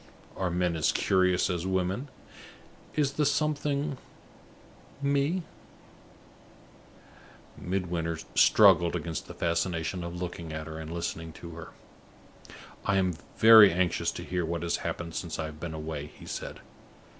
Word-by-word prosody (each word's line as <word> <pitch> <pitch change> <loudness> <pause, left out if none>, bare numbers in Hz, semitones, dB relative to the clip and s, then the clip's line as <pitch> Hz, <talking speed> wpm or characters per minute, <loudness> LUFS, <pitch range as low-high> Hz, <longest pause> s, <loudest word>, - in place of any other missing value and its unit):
Are 95 -1 -1
men 90 0 0
as 80 - +2
curious 90 -1 +2
as 90 -1 -2
women? 95 +8 -1 0.9
Is 145 -3 +2
the 150 - +1
something 145 -1 0 1.0
Me?" 140 +5 +1 2.1
Midwinter 90 -3 -2 0.2
struggled 85 0 +6
against 85 -2 -4
the - - -9
fascination 85 +1 -1
of 85 0 -6
looking 85 -3 -5
at 80 0 -5
her 80 0 -7
and 80 0 -7
listening 85 -1 -4
to 85 - -10
her. 80 -1 -9 1.1
"I 100 -1 +1
am 95 -2 +2 0.2
very 110 -2 +9
anxious 90 +1 +1
to - - -6
hear 90 -1 -2
what 85 +1 -3
has 85 0 0
happened 85 -1 -4
since 85 -1 -4
I 80 - -2
have 75 -1 -8
been 80 -1 -5
away," 75 -2 -5
he - - -14
said. - - -6
90 Hz, 135 wpm, -28 LUFS, 85-95 Hz, 2.1 s, very